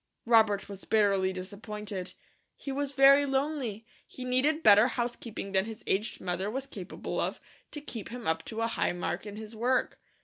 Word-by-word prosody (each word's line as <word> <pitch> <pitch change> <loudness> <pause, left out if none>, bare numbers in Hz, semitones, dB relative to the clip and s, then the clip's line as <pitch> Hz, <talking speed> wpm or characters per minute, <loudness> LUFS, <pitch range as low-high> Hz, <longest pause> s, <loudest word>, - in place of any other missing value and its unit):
Robert 220 -4 +4
was 200 -1 -8
bitterly 200 -3 +3
disappointed. 200 0 -6 0.4
He 275 - -6
was 280 0 -2
very 275 +1 +7
lonely; 270 -6 -1 0.2
he 255 - -8
needed 285 +6 +1
better 210 +2 +8
housekeeping 240 -5 -4
than 190 0 +2
his 225 0 -8
aged 210 +4 -1
mother 185 +2 -2
was 265 +4 -3
capable 275 - -6
of, - - -1 0.3
to 295 - -7
keep 230 -8 -6
him 240 -1 -7
up 160 0 0
to 225 0 -4
a 230 - +2
high 230 - 0
mark 175 +4 -3
in 205 - -7
his 220 +1 -8
work. 250 +4 0
220 Hz, 175 wpm, -30 LUFS, 200-255 Hz, 0.4 s, better